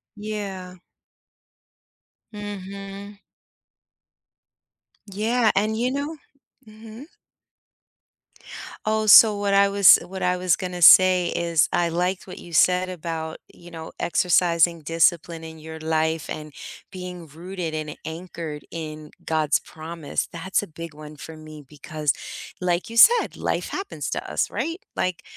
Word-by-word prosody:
Yeah. 200 -4 -6 1.6
Mhm. 200 0 -8 1.9
Yeah, 220 +3 +1
and 215 +2 +1
you 250 +2 0
know 285 +4 -3 0.5
mhm? 220 +4 -12 1.8
Oh, 215 0 0
so 215 +1 +9
what 200 -1 0
I 200 0 +5
was 200 -1 +7
what 190 +1 -6
I 180 0 +1
was 180 -2 +2
gonna 180 -1 -6
say 185 -1 +7
is 170 -2 +2
I 175 -1 +1
liked 180 +3 -2
what 185 - -9
you 170 - -12
said 180 +3 +3
about, 165 -3 -5
you 175 - -15
know, 160 -1 -8
exercising 170 -1 +2
discipline 165 +1 +1
in 160 0 -10
your 160 +1 -9
life 160 0 -1
and 150 -1 -7 0.4
being 180 -3 -8
rooted 170 +2 -6
and 155 -1 -5
anchored 160 -2 -7
in 155 -2 -7
God's 155 -3 +1
promise, 160 -1 -5
that's 190 +4 -2
a - - -8
big 165 0 -9
one 150 0 -11
for 160 +3 -10
me 155 -1 -11
because 150 +1 -3 0.5
like 180 +1 -1
you 230 - -8
said, 470 - +6
life - - -2
happens 390 +1 -5
to - - -4
us, - - 0
right? 330 +2 -3 0.2
Like 180 -1 -2
180 Hz, 130 wpm, -23 LUFS, 160-200 Hz, 1.9 s, so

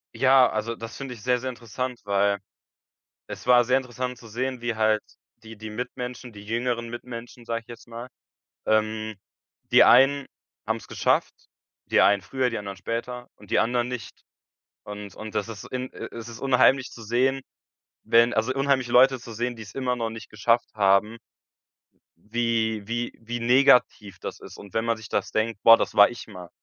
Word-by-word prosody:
Ja, 130 -1 +5
also 110 +2 -3
das 115 0 -8
finde 135 -2 -6
ich 115 - -13
sehr, 125 +1 +1
sehr 130 +1 -4
interessant, 125 +1 -5
weil 100 0 +1 0.9
es - - -9
war 125 -1 +6
sehr 125 +2 +2
interessant 125 -1 -4
zu 120 - -14
sehen, 125 +3 -3
wie 120 -1 -2
halt 110 -1 +2 0.4
die 110 0 -11
die 110 +1 -8
Mitmenschen, 125 +1 -6
die 100 -1 -12
jüngeren 120 +1 -2
Mitmenschen, 120 0 -9
sage 115 0 -3
ich - - -36
jetzt 120 0 -11
mal 120 +2 -8 0.6
ähm, 110 0 0 0.6
die - - +8
einen 135 +3 +5 0.4
haben - - -1
es - - -13
geschafft. - - +1 0.5
Die - - +3
einen 100 -1 +4
früher, 130 +3 -1
die 115 - -4
anderen 100 -1 -6
später 120 +5 -5
und - - -17
die - - +4
anderen 120 +1 +1
nicht. 125 -4 -7 0.6
Und 105 -2 -9
und 110 0 -9
das 105 +1 -1
ist 105 -3 -8
in 130 0 -4
äh, - - -7 0.3
unheimlich 135 0 +3
zu 115 - -11
sehen, 130 +5 +1 0.6
wenn 115 +1 +4
also, 110 +3 0
unheimlich 135 -2 +1
Leute 130 +2 +5
zu 120 - -11
sehen, 120 +2 -2
die 115 - -10
es 100 - -13
immer 125 -2 -1
noch 115 -2 -2
nicht 115 0 -9
geschafft 115 +3 +1
haben 105 +2 +2 1.1
wie 115 -2 0
wie 120 +1 -3
wie 120 +2 -5
negativ 120 -6 +3
das - - -7
ist. - - -12
Und 100 -2 -13
wenn 115 +1 0
man 115 -1 0
sich 110 -1 -11
das - - -2
denkt: 110 -1 -1
„Boah, 115 0 +9
das - - -3
war 105 - +8
ich 120 - -9
mal.“ 90 -5 -10
115 Hz, 185 wpm, -25 LUFS, 110-125 Hz, 1.1 s, Boah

